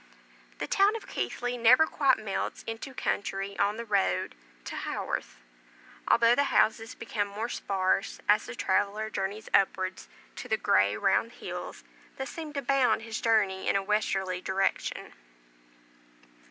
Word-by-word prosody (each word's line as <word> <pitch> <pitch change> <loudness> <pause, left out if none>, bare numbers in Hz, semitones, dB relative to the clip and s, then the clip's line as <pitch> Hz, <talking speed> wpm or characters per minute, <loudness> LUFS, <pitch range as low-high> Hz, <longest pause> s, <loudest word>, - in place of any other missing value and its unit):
The - - -3
town 400 +2 +3
of 455 - -6
Keighley 245 0 -3
never 250 +6 +7
quite 275 -4 +2
melts 215 -3 -4
into 225 +4 -6
country 195 -3 -2
on 205 +2 +2
the 235 - -5
road 200 -3 +1 0.3
to - - -5
Haworth, - - -4 0.7
although 235 0 +5
the 285 +3 +2
houses 225 -3 +1
become 205 -2 -2
more 215 +4 -4
sparse 195 -1 -1
as 210 +1 +3
the - - -7
traveller 210 +1 0
journeys 205 +2 -3
upwards 185 -1 +1 0.3
to - - -6
the - - +1
grey 100 +1 +3
round - - +1
hills - - -7 0.3
that 265 -1 -4
seem 320 -2 -7
to 280 -1 -3
bound 260 -3 +2
his 225 -1 -5
journey 205 -4 +2
in - - +2
a 195 - +1
westerly 195 -3 0
direction. 190 +1 -1
215 Hz, 145 wpm, -29 LUFS, 195-240 Hz, 0.7 s, never